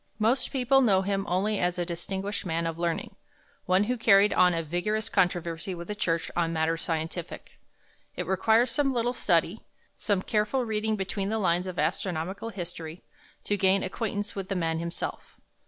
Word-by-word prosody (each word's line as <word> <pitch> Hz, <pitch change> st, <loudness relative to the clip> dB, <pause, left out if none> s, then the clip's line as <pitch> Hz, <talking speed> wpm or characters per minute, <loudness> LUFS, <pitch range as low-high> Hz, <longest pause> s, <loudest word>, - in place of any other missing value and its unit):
Most 225 Hz, +5 st, +1 dB
people 270 Hz, 0 st, +3 dB
know 195 Hz, -6 st, +4 dB
him 195 Hz, 0 st, -1 dB
only 200 Hz, +4 st, +1 dB
as 180 Hz, 0 st, 0 dB
a 175 Hz, -, -1 dB
distinguished 190 Hz, +4 st, -4 dB
man 165 Hz, -2 st, -1 dB
of 165 Hz, 0 st, -3 dB
learning; 170 Hz, -1 st, -2 dB, 0.5 s
one 185 Hz, +2 st, +4 dB
who 250 Hz, +4 st, -1 dB
carried 205 Hz, -2 st, +5 dB
on 180 Hz, 0 st, +5 dB
a 165 Hz, -1 st, -1 dB
vigorous 175 Hz, +7 st, -1 dB
controversy 175 Hz, 0 st, 0 dB
with 170 Hz, 0 st, -8 dB
the 210 Hz, -, -3 dB
Church 165 Hz, -5 st, -1 dB
on 170 Hz, -1 st, +1 dB
matters 165 Hz, 0 st, 0 dB
scientific. 165 Hz, +1 st, -4 dB, 0.6 s
It -, -, -3 dB
requires 220 Hz, +6 st, +3 dB
some 275 Hz, +2 st, +1 dB
little 240 Hz, 0 st, 0 dB
study, 175 Hz, -1 st, +1 dB, 0.4 s
some 205 Hz, -3 st, 0 dB
careful 220 Hz, +4 st, 0 dB
reading 220 Hz, 0 st, 0 dB
between 195 Hz, 0 st, -3 dB
the 220 Hz, -, 0 dB
lines 180 Hz, -2 st, +1 dB
of 180 Hz, -1 st, -6 dB
astronomical 190 Hz, +5 st, -2 dB
history, 175 Hz, -4 st, -7 dB, 0.4 s
to 205 Hz, -, 0 dB
gain 190 Hz, 0 st, +3 dB
acquaintance 205 Hz, +1 st, -3 dB
with 195 Hz, -1 st, -5 dB
the 195 Hz, -, -1 dB
man 165 Hz, -2 st, 0 dB
himself. 170 Hz, 0 st, -5 dB
190 Hz, 170 wpm, -28 LUFS, 170-215 Hz, 0.6 s, carried